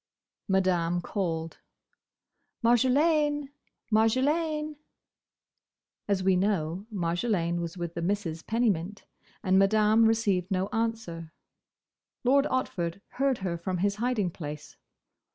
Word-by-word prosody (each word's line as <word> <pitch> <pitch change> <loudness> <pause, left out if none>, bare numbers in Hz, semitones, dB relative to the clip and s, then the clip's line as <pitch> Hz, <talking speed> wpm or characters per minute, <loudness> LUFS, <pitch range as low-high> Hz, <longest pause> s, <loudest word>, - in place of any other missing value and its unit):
Madame 180 -3 +2
called, 165 -4 -3 1.0
"Marjolaine! 290 +4 +3 0.4
Marjolaine!" 300 +7 +1 1.3
As 200 -2 +1
we 190 0 +4
know, 185 -1 -1
Marjolaine 175 -1 0
was 170 +1 -5
with 170 -1 -4
the 170 - -4
Misses 170 -3 -2
Pennymint, 205 -3 -1 0.4
and 190 -2 +4
Madame 215 +3 +4
received 205 -5 +1
no 190 0 0
answer. 225 -8 -3 0.9
Lord 275 +3 +4
Otford 190 -9 -2
heard 270 -1 0
her 170 -2 -2
from 180 +2 -2
his 200 +3 0
hiding 220 -6 0
place. 150 -3 -8
200 Hz, 100 wpm, -28 LUFS, 175-235 Hz, 1.3 s, we